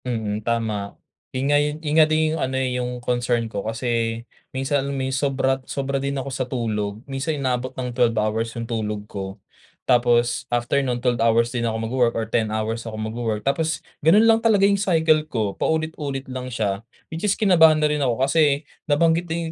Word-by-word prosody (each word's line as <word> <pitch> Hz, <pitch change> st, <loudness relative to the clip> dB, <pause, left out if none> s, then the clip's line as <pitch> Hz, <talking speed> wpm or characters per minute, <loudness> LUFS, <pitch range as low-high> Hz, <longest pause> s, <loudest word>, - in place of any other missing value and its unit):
Mm. 110 Hz, -4 st, -2 dB
Tama. 110 Hz, -3 st, -2 dB, 0.3 s
Yun 130 Hz, +1 st, -2 dB
nga 145 Hz, 0 st, +4 dB
yung, 150 Hz, 0 st, -1 dB
yun 150 Hz, -2 st, -3 dB
nga -, -, +8 dB
din 155 Hz, 0 st, +2 dB
yung 160 Hz, -, -3 dB
ano, 130 Hz, 0 st, -1 dB
eh, 130 Hz, -1 st, 0 dB
yung 125 Hz, 0 st, -2 dB
concern 120 Hz, -1 st, 0 dB
ko, 100 Hz, -3 st, -4 dB
kasi 115 Hz, -1 st, -1 dB, 0.3 s
minsan 135 Hz, +1 st, 0 dB
may 135 Hz, -1 st, -2 dB
sobra 135 Hz, -1 st, 0 dB
sobra 135 Hz, +1 st, -3 dB
din 140 Hz, 0 st, -2 dB
ako 135 Hz, +1 st, -4 dB
sa 130 Hz, -, -1 dB
tulog. 105 Hz, -4 st, -2 dB
Minsan 140 Hz, +3 st, -2 dB
inaabot 130 Hz, -1 st, -1 dB
ng 125 Hz, -1 st, -3 dB
12 120 Hz, -3 st, +2 dB
hours 110 Hz, +2 st, 0 dB
yung 115 Hz, -, -3 dB
tulog 105 Hz, -2 st, -3 dB
ko. 95 Hz, -2 st, -6 dB, 0.5 s
Tapos 120 Hz, -1 st, +3 dB
after 120 Hz, +3 st, +1 dB
no'n 125 Hz, -3 st, -1 dB
12 120 Hz, -1 st, 0 dB
hours 115 Hz, +1 st, +3 dB
din 120 Hz, -1 st, -1 dB
ako 110 Hz, -, -2 dB
magwo-work, 120 Hz, -1 st, +1 dB
or 115 Hz, -, -1 dB
10 110 Hz, 0 st, 0 dB
hours 110 Hz, +1 st, -2 dB
ako 110 Hz, -2 st, -6 dB
magwo-work. 110 Hz, -1 st, -3 dB
Tapos 160 Hz, +3 st, 0 dB, 0.2 s
gano'n 200 Hz, +9 st, +6 dB
lang 225 Hz, 0 st, +5 dB
talaga 210 Hz, -4 st, +4 dB
yung 200 Hz, -1 st, +2 dB
cycle 160 Hz, -5 st, +3 dB
ko, 110 Hz, -6 st, -1 dB
paulit-ulit 155 Hz, -4 st, -2 dB
lang 130 Hz, 0 st, -5 dB
siya, 105 Hz, -4 st, -1 dB, 0.3 s
which 165 Hz, -, -5 dB
is 205 Hz, -2 st, +2 dB
kinabahan 165 Hz, -6 st, +6 dB
na 150 Hz, -, +3 dB
rin 150 Hz, -1 st, -1 dB
ako. 130 Hz, 0 st, +1 dB
Kasi 145 Hz, 0 st, +2 dB, 0.2 s
nabanggit 165 Hz, +3 st, +2 dB
din 165 Hz, 0 st, -2 dB
130 Hz, 195 wpm, -23 LUFS, 115-145 Hz, 0.5 s, nga